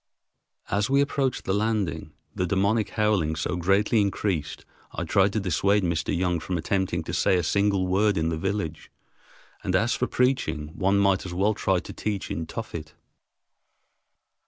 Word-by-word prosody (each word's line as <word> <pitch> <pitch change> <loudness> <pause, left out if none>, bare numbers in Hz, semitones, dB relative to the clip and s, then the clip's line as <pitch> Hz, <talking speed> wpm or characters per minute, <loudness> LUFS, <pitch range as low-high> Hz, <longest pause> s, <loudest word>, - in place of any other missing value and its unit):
As 100 +3 +1
we 140 +1 +4
approached 140 -2 0
the 95 - 0
landing, 105 -3 -1 0.2
the 90 - -1
demoniac 100 +3 +1
howling 105 -8 +1
so 80 +3 -2
greatly 100 +5 +2
increased 95 -6 -2 0.3
I - - -3
tried 100 0 +3
to 110 - +1
dissuade 100 +2 +1
Mr. 85 -3 -1
Young 90 -1 0
from 90 +2 -3
attempting 85 0 -1
to - - -6
say 95 - +3
a 90 - 0
single 100 +2 +1
word 100 +2 +2
in 80 0 +1
the 80 - -2
village, 95 -2 -3 0.7
and 90 - 0
as 115 +6 +2
for 125 - 0
preaching 80 - 0
one 95 +5 +1
might 100 -1 +3
as 90 -2 -6
well 100 +4 +2
try 95 -2 +1
to - - -6
preach 105 -3 -3
in 80 +1 -3
Tophet. 85 -9 -7
95 Hz, 165 wpm, -26 LUFS, 85-105 Hz, 0.7 s, we